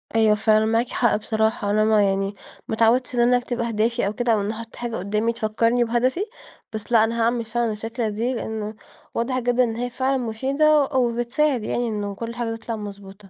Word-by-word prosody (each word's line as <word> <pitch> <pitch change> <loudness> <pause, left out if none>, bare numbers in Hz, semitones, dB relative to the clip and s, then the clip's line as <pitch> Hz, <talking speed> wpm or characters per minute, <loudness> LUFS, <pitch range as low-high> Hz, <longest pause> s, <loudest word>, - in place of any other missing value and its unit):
أيوه، 220 -1 +5
فعلًا 215 0 +3
معاكِ 225 +2 +1
حق 235 - +2
بصراحة. 220 -1 0
أنا 215 +1 +3
ما 215 -1 +4
يعني 195 0 0 0.3
ما - - -2
اتعودتش 240 +3 +2
إن 240 - 0
أنا 245 +1 +5
أكتب 245 0 -4
أهدافي 230 -2 0
أو 205 - -2
كده، 240 +1 +1
أو 210 - +1
إني 205 +2 -2
أحط 230 0 -8
حاجة 240 -1 -4
قُدامي 210 +5 0
تفكرني 230 +2 +1
بهدفي، 255 - 0 0.5
بس 215 +2 -6
لأ، 225 -2 +6
أنا 230 +1 0
هاعمل 230 0 +1
فعلًا 230 0 -1
الفكرة 225 +1 -3
دي، 230 +5 -1
لأنه 220 -2 -4 0.4
واضح 255 +2 -1
جدًا 245 0 +2
إن 225 -2 -1
هي 245 +2 -2
فعلًا 260 +2 0
مفيدة 275 +6 +2
أ 265 - -6
وبتساعد 245 +2 +1
يعني 240 +2 -1
إنه 205 -2 -3
كل 230 +3 -6
حاجة 230 -2 -2
تطلع 225 0 -5
مضبوطة. 200 -1 -9
230 Hz, 205 wpm, -23 LUFS, 215-245 Hz, 0.5 s, لأ